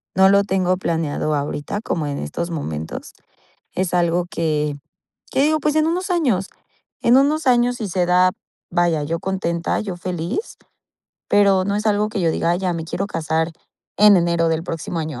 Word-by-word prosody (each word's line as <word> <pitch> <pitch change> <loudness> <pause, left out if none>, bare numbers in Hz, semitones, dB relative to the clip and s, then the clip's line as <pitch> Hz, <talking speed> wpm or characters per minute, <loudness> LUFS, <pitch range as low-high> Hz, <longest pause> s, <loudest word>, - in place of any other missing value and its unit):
no 190 +1 +6
lo 200 0 +5
tengo 185 -2 +1
planeado 160 -3 -1
ahorita, 145 +7 -3
como 160 -8 -2
en 145 -1 -3
estos 170 - -4
momentos, 80 - -5 0.6
es 185 -1 -1
algo 175 0 +2
que 150 -3 -1 0.6
que - - +1
digo, 310 +1 +2
pues, 300 0 0
en 310 0 +3
unos 365 +3 -1
años, 245 - +1 0.5
en 240 +2 +5
unos 295 +2 +2
años, 245 0 +3
si 215 -4 -4
se 180 0 +1
da, 180 +1 +4 0.4
vaya, 170 -3 +1
yo 165 +3 -2
contenta, 170 -3 -1
yo 190 -4 -5
feliz, 180 - -4 0.7
pero 195 -2 +4
no 200 +1 -1
es 210 +1 -2
algo 210 0 +2
que 215 -2 -3
yo 165 -2 +2
diga: 165 - 0
"Ay, 175 - +1
ya 185 -2 0
me 165 -1 -4
quiero 190 +4 -3
casar 160 -2 -1 0.4
en 210 0 +7
enero 170 -1 +2
del 165 0 0
próximo 165 -1 -4
año", 155 -6 -5
180 Hz, 180 wpm, -21 LUFS, 165-205 Hz, 0.7 s, en